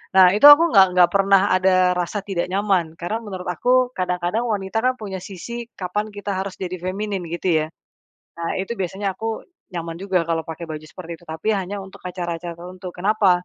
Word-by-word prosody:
Nah, 185 -1 +8
itu 215 - +4
aku 290 +3 +11
nggak 195 -2 +7
nggak 180 -1 +6
pernah 195 -1 +5
ada 185 -1 +3
rasa 180 +4 -2
tidak 195 -3 -2
nyaman. 190 -5 +1
Karena 175 +6 -2
menurut 190 -4 -7
aku 250 +5 +2
kadang-kadang 180 +4 -1
wanita 205 -2 -2
kan 255 - +3
punya 195 -3 -5
sisi 235 +5 -7
kapan 200 +3 -2
kita 205 0 -6
harus 190 0 -4
jadi 185 -1 -3
feminin, 195 +1 -3
gitu, 170 +2 -3 0.2
ya? - - -9 0.7
Nah, 165 0 -2
itu 190 +4 -3
biasanya 195 +2 -2
aku 225 +1 -4 0.3
nyaman 170 -1 -4
juga 190 -1 +1
kalau 165 -1 0
pakai 165 +1 -7
baju 155 -1 -5
seperti 170 -1 -9
itu. 175 - -18
Tapi 160 +6 -4
hanya 195 0 -3
untuk 190 - -13
acara-acara 175 -1 -4
tertentu. 180 +1 -8
Kenapa? 185 -2 +2
190 Hz, 185 wpm, -22 LUFS, 175-205 Hz, 0.7 s, aku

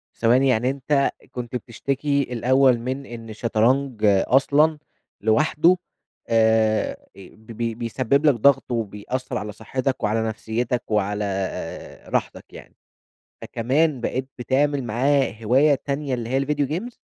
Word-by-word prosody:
ثواني، 125 +4 +3
يعني 125 0 +2
أنت 140 +1 +1 0.2
كنت 125 0 -6
بتشتكي 140 +4 -1
الأوّل 130 +1 +3
من 130 +3 -4
إن 115 -1 -9
الشطرنج 115 +3 0
أصلًا 140 +10 +3 0.4
لوحده 150 - +3 0.5
آآ، 110 -1 +2 0.2
ب 110 +4 -14
ب 115 0 -3
بيسبب 130 +5 0
لَك 145 - +6
ضغط 135 +2 +3
وبيأثر 115 +3 -3
على 105 - -5
صحتك 130 +5 -3
وعلى 110 +2 +1
نفسيتَك 115 +3 -2
وعلى 105 0 0 0.8
راحتَك - - -3
يعني، - - -13 0.7
فكمان 135 +4 0
بقيت 130 +2 -2
بتعمل 140 +2 0
معاه 130 +3 +1
هواية 135 +6 +4
تانية، 140 -1 -2
اللي 120 -2 -3
هي 135 +1 +1
الڤيديو 145 0 -1
جيمز؟! 180 - -4
125 Hz, 125 wpm, -23 LUFS, 115-140 Hz, 0.8 s, لَك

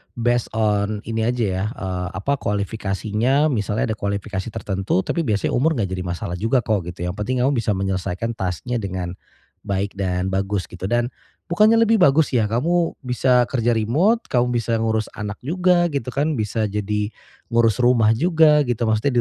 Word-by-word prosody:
based 120 0 +1
on 105 -1 0
ini 110 0 -1
aja 120 -1 0
ya, 95 -1 -1
eee, 90 -5 -3
apa 140 +8 -1
kualifikasinya 105 +7 0
misalnya 110 -1 -1
ada - - -9
kualifikasi 100 0 -3
tertentu 95 -4 -1
tapi 170 - -1
biasanya 105 -2 0
umur 155 +6 +2
nggak 100 -7 -2
jadi 90 -1 -3
masalah 85 0 -4
juga 120 +4 +1
kok 100 -6 -1
gitu 90 0 -6
yang 90 - -2
penting 125 +4 0
kamu 135 - +3
bisa 115 -5 0
menyelesaikan 95 +2 -2
task-nya 95 +5 -3
dengan 95 -4 -4 0.6
baik 100 +1 -1
dan 90 0 -1
bagus 95 0 -1
gitu 90 +1 -5
dan 120 +3 0 0.4
bukannya 215 +6 +5
lebih 225 0 +3
bagus 150 -2 +4
ya 115 -5 +2
kamu 165 +10 0
bisa 125 0 +3
kerja 120 -2 +1
remote 160 - +2
kamu 125 0 +1
bisa 115 0 0
ngurus 110 -1 -1
anak 105 -1 -4
juga 175 +3 +2
gitu 140 -5 -3
kan 150 +3 +1
bisa 110 +1 -1
jadi 105 +1 -2 0.4
ngurus 115 -2 +3
rumah 115 -3 +4
juga 155 0 +4
gitu 120 -2 -1
maksudnya 110 +5 +1
110 Hz, 170 wpm, -21 LUFS, 100-125 Hz, 0.6 s, bukannya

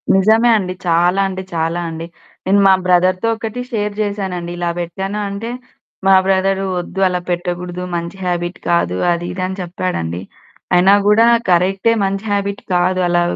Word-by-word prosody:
నిజమే 220 +5 +4
అండి. 185 -2 -3
చాలా 175 +3 +3
అంటే, 190 0 -5
చాలా 165 +1 -1
అండి. 165 +1 -6 0.4
నేను 195 +2 +3
మా 190 - +7
బ్రదర్‌తో 185 +3 +2
ఒకటి 225 +2 -5
షేర్ 210 -2 -1
చేశానండి. 190 -4 -3
ఇలా 175 -1 -1
పెట్టాను 190 +4 -4
అంటే, 200 +4 -5 0.6
మా 195 - +6
బ్రదరు, 195 0 +1 0.2
"వద్దు 175 +2 -6
అలా 180 -1 -1
పెట్టకూడదు, 175 0 -3
మంచి 170 +2 -4
హాబిట్ 175 0 -2
కాదు 170 - +1 0.2
అది 170 0 -2
ఇది" 185 - -5
అని 190 +1 -6
చెప్పాడండి. 170 - -3 0.5
అయినా 185 +3 +6
కూడా 215 +2 +5 0.2
కరెక్టే 190 +5 +3
మంచి 195 +2 -3
హాబిట్ 200 0 -1
కాదు, 185 +1 +2
అలా 175 0 +2
185 Hz, 155 wpm, -17 LUFS, 175-195 Hz, 0.6 s, మా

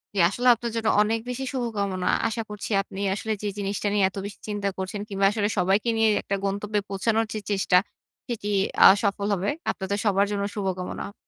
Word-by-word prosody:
জি, - - 0
আসলেও 245 +5 +4
আপনার 235 +1 -5
জন্য 225 -1 -1
অনেক 220 +2 +1
বেশি 250 +2 -3
শুভকামনা। 200 -7 -2 0.2
আশা 225 +1 -2
করছি 210 +1 -6
আপনি 195 0 -9
আসলে 220 +2 -3
যে - - -1
জিনিসটা 200 +1 -2
নিয়ে 205 -1 +2
এত 190 - -13
বেশি 200 - -8
চিন্তা 205 -1 -2
করছেন 190 +2 -4
কিংবা, 195 -1 +1
আসলে 210 -1 0
সবাইকে 195 +5 +2
নিয়ে 225 0 +4
একটা 200 - -2
গন্তব্যে 205 +2 -1
পৌঁছানোর 220 +3 +1
যে 215 - -3
চেষ্টা, 195 -2 +3 0.5
সেটি 230 -4 -4 0.4
আ - - +13 0.2
সফল 200 0 0
হবে। 195 +1 -1 0.2
আপনাদের 195 +1 -3
সবার 200 -1 +3
জন্য 200 -1 -1
শুভকামনা। 190 0 -3
205 Hz, 185 wpm, -25 LUFS, 195-220 Hz, 0.5 s, আ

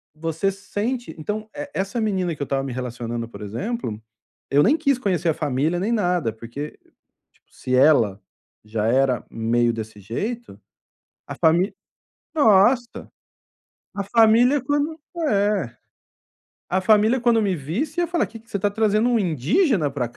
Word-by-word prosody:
você 165 +4 -1
sente 220 +5 -4
então, 210 +7 -4
e 290 0 -6
essa 200 +5 -2
menina 190 -5 0
que - - -13
eu 140 - 0
estava 135 0 -1
me 135 - -4
relacionando, 120 -2 -4
por 110 -2 -12
exemplo, 115 - -4 0.5
eu 145 +1 +4
nem 285 - +4
quis 280 -5 +1
conhecer 185 -7 0
a - - +3
família, 150 +6 0
nem 205 +5 -1
nada, 180 - +1
porque 120 +7 -8 0.7
se 130 - -3
ela 125 -8 +4 0.5
já 110 0 -1
era 130 +1 +2
meio 120 +1 +1
desse 110 -1 -7
jeito, 215 - -5 0.7
a - - -6
fami 175 +4 +2 0.6
nossa, 235 -1 +3 0.9
a 200 - -2
família 230 +6 +4
quando 290 +4 -1 0.3
é, 200 - 0 0.9
a 185 - +1
família 215 +5 +4
quando 235 -2 +3
me 195 -3 +1
visse, 275 - -2
falar, 345 0 +1
o - - -8
que 225 0 -11
que 230 - -25
você - - -1
está 205 +2 +1
trazendo, 215 +2 +2
um 235 - +3
indígena 180 - +1
para 125 -4 -2
cá. 120 - -21
190 Hz, 155 wpm, -22 LUFS, -, 0.9 s, eu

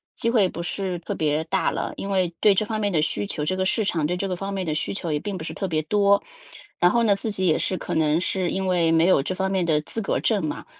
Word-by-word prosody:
机 230 - 0
会 215 -6 +4
不 170 -1 -6
是 180 0 -3
特 - - -5
别 155 0 0
大 190 +3 +1
了。 - - -3
因 195 - -5
为 185 -3 +1
对 205 -2 +5
这 215 - +1
方 220 -1 -3
面 205 -1 0
的 160 -4 +2
需 105 -10 -1
求 150 - -3
这 185 +4 -1
个 190 - 0
市 220 +3 +1
场 165 -6 0
对 175 - -1
这 195 +2 -2
个 185 - -2
方 195 +2 -5
面 190 -1 -2
的 155 - -1
需 155 - -2
求 175 -5 -4
也 150 - 0
并 200 +3 -4
不 160 - -7
是 - - -5
特 195 - -3
别 160 -3 0
多。 200 +4 +3 0.6
然 175 - +5
后 235 - +2
呢， 210 -3 +4
自 215 +3 -3
己 190 -2 -1
也 160 - +3
是 185 - -1
可 - - -5
能 155 0 +2
是 185 0 -1
因 190 0 -2
为 170 -3 +2
没 165 0 +4
有 185 -6 +4
这 185 +7 -3
方 190 0 -1
面 190 -2 +1
的 155 -3 +2
资 225 +8 -4
格 195 - 0
证 205 -6 +1
嘛， 150 - -4
185 Hz, 320 characters per minute, -24 LUFS, 160-200 Hz, 0.6 s, 对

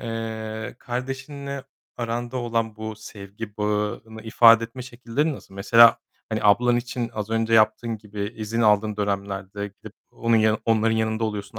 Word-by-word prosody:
eee, 110 -1 -5
kardeşinle 135 +2 -5 0.3
aranda 120 +1 -3
olan 115 -3 -2
bu 110 -1 -6
sevgi 105 0 -9
bağını 105 +1 -2
ifade 115 0 +6
etme 125 +2 -8
şekillerin 130 +5 -2
nasıl? 95 - -11
Mesela, 115 +4 +6 0.3
hani, 110 -1 -2
ablan 120 +4 +4
için 120 -1 -3
az 105 0 -4
önce 115 0 +1
yaptığın 110 +1 +3
gibi 105 +1 -6
izin 110 +2 -3
aldığın 105 -1 +3
dönemlerde 100 0 -3
gidip 100 - -14 0.2
onun 115 0 +1
yanı 110 0 +3
onların 115 0 +2
yanında 110 0 0
oluyorsun 105 0 -5
110 Hz, 145 wpm, -24 LUFS, 105-120 Hz, 0.3 s, ifade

